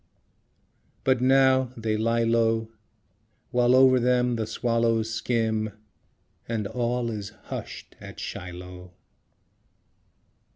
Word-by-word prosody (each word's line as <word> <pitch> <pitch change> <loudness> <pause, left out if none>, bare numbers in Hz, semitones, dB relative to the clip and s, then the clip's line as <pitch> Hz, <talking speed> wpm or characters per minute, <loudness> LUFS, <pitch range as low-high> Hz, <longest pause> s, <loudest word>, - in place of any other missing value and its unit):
But 130 -2 +2
now 130 -1 +4
they 110 -1 -1
lie 115 +2 +1
low, 115 -1 +1 0.8
While 125 0 +4
over 130 -1 +6
them 125 0 +2
the 110 -2 -2
swallows 115 -1 0
skim, 110 -2 -1 0.8
And 110 -3 -2
all 120 +2 -1
is 105 -1 -6
hushed - - -8
at - - -10
Shiloh. 90 0 -8
115 Hz, 95 wpm, -26 LUFS, 110-125 Hz, 0.8 s, over